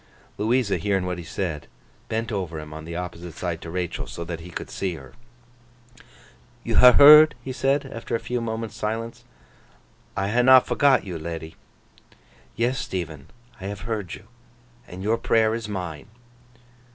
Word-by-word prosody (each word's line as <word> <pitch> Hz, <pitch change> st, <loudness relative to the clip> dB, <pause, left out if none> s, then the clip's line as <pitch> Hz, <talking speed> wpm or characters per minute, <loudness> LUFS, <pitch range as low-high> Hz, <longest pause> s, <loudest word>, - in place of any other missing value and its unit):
Louisa 115 Hz, 0 st, +1 dB
hearing 100 Hz, -3 st, 0 dB
what 90 Hz, -1 st, -3 dB
he -, -, -7 dB
said, 80 Hz, -2 st, -4 dB, 0.4 s
bent 115 Hz, +1 st, -2 dB
over 90 Hz, -6 st, -3 dB
him 75 Hz, 0 st, -9 dB
on 80 Hz, 0 st, -8 dB
the 85 Hz, +1 st, -7 dB
opposite 85 Hz, -1 st, -6 dB
side 85 Hz, -2 st, -4 dB
to 85 Hz, -, -8 dB
Rachael, 90 Hz, 0 st, -3 dB
so 85 Hz, -, -6 dB
that 85 Hz, -1 st, -6 dB
he 85 Hz, +2 st, -10 dB
could 85 Hz, -, -7 dB
see 95 Hz, -3 st, -3 dB
her. 65 Hz, -4 st, -12 dB, 1.5 s
'You -, -, -1 dB
ha' 125 Hz, 0 st, +9 dB
heard?' 150 Hz, +2 st, +9 dB
he 130 Hz, -, -5 dB
said, 135 Hz, +3 st, +1 dB
after 115 Hz, -3 st, -5 dB
a -, -, -1 dB
few 125 Hz, -1 st, -3 dB
moments' 110 Hz, -1 st, -4 dB
silence. 115 Hz, +2 st, -4 dB, 0.9 s
'I 95 Hz, 0 st, 0 dB
ha' 120 Hz, +3 st, +2 dB
not 130 Hz, 0 st, +7 dB
forgot 140 Hz, -3 st, +3 dB
you, 90 Hz, -4 st, -6 dB
ledy.' 80 Hz, 0 st, -6 dB, 1.0 s
'Yes, 120 Hz, +2 st, 0 dB
Stephen, 80 Hz, -6 st, -5 dB, 0.3 s
I -, -, -6 dB
have 100 Hz, 0 st, -5 dB
heard 110 Hz, -5 st, -4 dB
you. -, -, -15 dB, 0.6 s
And 90 Hz, +1 st, -9 dB
your 115 Hz, +3 st, +1 dB
prayer 110 Hz, -1 st, +2 dB
is 115 Hz, -1 st, -4 dB
mine. 90 Hz, -4 st, -5 dB
100 Hz, 165 wpm, -24 LUFS, 85-115 Hz, 1.5 s, ha